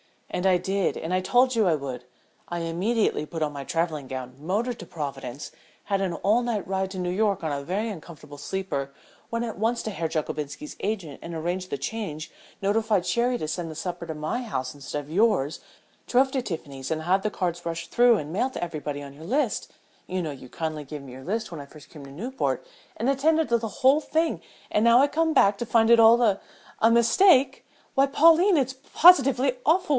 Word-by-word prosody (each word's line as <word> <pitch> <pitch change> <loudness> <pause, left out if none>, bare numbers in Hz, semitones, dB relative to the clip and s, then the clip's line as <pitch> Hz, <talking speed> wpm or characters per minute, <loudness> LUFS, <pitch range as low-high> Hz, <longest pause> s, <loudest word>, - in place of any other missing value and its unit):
"And 180 - 0
I 185 -1 +5
did, 190 +2 -1
and 165 +3 -4
I 185 - +3
told 245 +7 +3
you 220 -4 +3
I 165 - +3
would. 130 -4 -6 0.4
I 175 - -4
immediately 180 +3 0
put 160 +1 -4
on 150 - -1
my 140 -1 -7
travelling 160 -3 -2
gown, 130 -1 -6
motored 215 - -2
to - - -8
Providence, 140 -4 -6 0.3
had 195 -1 -1
an 190 -3 -1
all 205 +8 +2
night 235 -5 -2
ride 190 0 -1
to 190 - -7
New 180 -1 -2
York 200 -1 0
on 160 - -1
a 140 -1 -2
very 200 +9 -2
uncomfortable 160 -6 -10
sleeper, 145 -4 -4 0.4
went 230 0 -2
at 225 -4 -5
once 230 +2 0
to 220 - -3
Herr 165 -4 -2
Jockobinski's 150 -2 -4
agent 195 -9 -3
and 170 0 -7
arranged 175 +3 -3
the 140 - -2
change, 155 0 -5 0.3
notified 210 -1 +1
Sherry 245 +1 +1
to 155 - -3
send 165 +1 -3
the 155 - -8
supper 175 +2 -5
to 160 - -5
my 155 +11 -2
house 130 - -4
instead 145 +1 -5
of 145 - -14
yours, 175 -7 +2 0.5
drove 265 +2 +3
to 265 - 0
Tiffany's 140 - -6
and 160 0 -1
had 190 +3 +2
the 215 - +1
cards 175 -4 -3
rushed 170 0 -4
through 240 -1 +5
and 150 -4 -5
mailed 255 +7 0
to - - -4
everybody 150 -3 -4
on 140 -1 -10
your 155 +3 -12
list 250 - -1 0.3
you 185 0 -2
know 160 -3 -3
you 135 -2 -10
kindly 155 +2 -4
gave 150 +1 -7
me 135 -2 -11
your 130 +1 -11
list 220 +2 -2
when 165 - -6
I - - -9
first 150 0 -15
came 150 -3 -11
to 135 - -11
Newport 240 - -3 0.3
and 245 - 0
attended 310 +2 +2
to 235 - +4
the 225 -1 -4 0.2
whole 270 +3 +6
thing, 320 +1 0 0.3
and 210 - +2
now 235 +1 +7
I 280 - +5
come 320 +2 +1
back 200 -6 +4
to 235 - -3
find 225 0 +3
it 235 - +7
all 230 +1 +7
a 225 -3 +5
er - - -17 0.4
a 225 - +5
mistake! 260 - +4 0.3
Why, 275 0 +4
Pauline, 330 +6 +5
it's 265 -2 +1 0.2
positively 270 -6 +6
awful! 340 +3 +3
190 Hz, 220 wpm, -25 LUFS, 155-235 Hz, 0.5 s, now